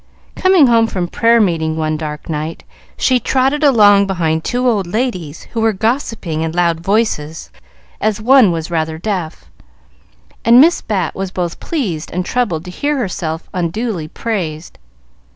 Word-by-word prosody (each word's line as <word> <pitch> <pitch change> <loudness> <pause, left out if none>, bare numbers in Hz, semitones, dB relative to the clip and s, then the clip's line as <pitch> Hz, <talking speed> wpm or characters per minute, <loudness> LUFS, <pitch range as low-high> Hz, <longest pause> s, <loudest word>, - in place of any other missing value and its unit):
Coming 370 -5 +4
home 230 -2 +4
from 180 -5 -3
prayer 230 +5 +3
meeting 160 -6 0
one 155 -1 -1
dark 150 -1 -6
night, 155 +1 -4 0.3
she 255 -1 +2
trotted 270 +5 0
along 205 -7 +5
behind 160 -4 -1
two 250 +1 -1
old 205 -7 +1
ladies 180 - -3
who 230 - -1
were 225 -1 +2
gossiping 220 - -2
in 160 0 -2
loud 170 -2 +1
voices, 170 -5 -1 0.5
as 215 0 0
one 245 -2 +5
was 165 0 -4
rather 160 -1 -1
deaf, 170 - -5 0.9
and 235 +2 +6
Miss 330 +5 +5
Bat 205 -4 -2
was 190 0 -4
both 175 -2 -4
pleased 195 - -3
and 180 +1 -3
troubled 190 -11 -1
to 180 - -7
hear 290 +10 -1
herself 175 -8 -4
unduly 180 0 -2
praised. 170 -6 -5
190 Hz, 150 wpm, -16 LUFS, 160-230 Hz, 0.9 s, and